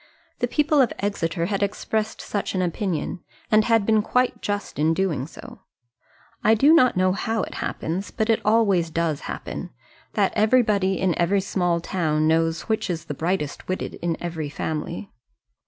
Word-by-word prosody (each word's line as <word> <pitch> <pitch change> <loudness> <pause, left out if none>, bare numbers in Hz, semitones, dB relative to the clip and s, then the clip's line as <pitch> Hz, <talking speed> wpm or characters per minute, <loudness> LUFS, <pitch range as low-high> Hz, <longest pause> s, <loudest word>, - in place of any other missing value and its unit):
The - - +1
people 300 -1 +3
of 250 - +2
Exeter 170 -4 -1
had 200 +2 -1
expressed 215 +2 -2
such 205 -1 -3
an 185 - +1
opinion, 180 0 -2 0.3
and 215 0 +5
had 225 -3 +3
been 220 0 +4
quite 250 +4 0
just 205 -8 -3
in 160 +2 +3
doing 160 -8 -1
so. - - -12 0.8
I 220 +1 +5
do 280 +8 +5
not 255 - +5
know 185 0 +3
how 220 +1 -1
it - - -6
happens, 180 +5 -3
but 220 -2 -1
it 225 -1 +2
always 205 -6 +3
does 160 -2 -1
happen, - - -5 0.4
that - - +1
everybody 210 -4 +3
in 185 -2 +2
every 180 +4 +3
small 175 -3 0
town 155 -3 0
knows 165 0 +2
which 220 -2 -1
is 170 -2 -3
the - - -4
brightest 160 0 -2
witted 185 - -3
in 170 -1 -1
every 165 -4 -4
family. 160 +6 -4
190 Hz, 170 wpm, -24 LUFS, 165-215 Hz, 0.8 s, and